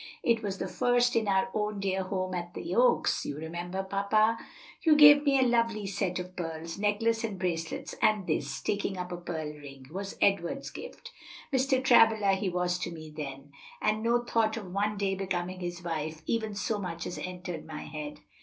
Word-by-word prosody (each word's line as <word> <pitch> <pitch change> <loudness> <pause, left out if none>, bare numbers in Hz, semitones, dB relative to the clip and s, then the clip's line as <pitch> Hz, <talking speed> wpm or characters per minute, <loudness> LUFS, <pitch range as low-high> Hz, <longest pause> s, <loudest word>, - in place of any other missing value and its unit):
"It 230 -2 +3
was 200 -3 -3
the - - -3
first 245 0 +2
in 225 -2 +2
our 195 +4 +2
own 210 -1 -1
dear 190 -1 0
home 185 0 -2
at 175 -1 -5
the 340 - -4
Oaks, - - +3
you 145 - -4
remember, 175 +4 -4
papa. 215 +3 +2 0.4
You 315 -2 +5
gave 290 -1 +9
me 280 -2 +4
a 260 - +4
lovely 230 -4 +1
set 195 -2 -1
of 180 0 -6
pearls 165 0 -5
necklace 225 +2 +1
and 215 -4 -3
bracelets 165 -3 -3
and 215 -3 +3
this," 140 -4 -2
taking 200 -1 -1
up 180 0 -5
a 175 - -3
pearl 160 -3 -4
ring, 140 -3 -11
"was 195 +3 -5
Edward's 200 +7 +1
gift. 485 - -9 0.4
Mr. 260 0 +2
Travilla 225 -5 +6
he 190 0 0
was 180 0 0
to 180 - -3
me 155 -2 -9
then, 140 -1 -7 0.3
and 215 0 +1
no 235 +1 +2
thought 225 -2 +1
of 195 -5 -7
one 205 +1 0
day 195 -1 0
becoming 185 -1 -3
his 175 -1 -5
wife 160 -1 -4
even 220 -3 -1
so 205 +2 -1
much 170 -4 -4
as 175 - -5
entered 180 -3 -5
my 160 -1 -7
head. 150 -1 -7
190 Hz, 190 wpm, -29 LUFS, 175-220 Hz, 0.4 s, gave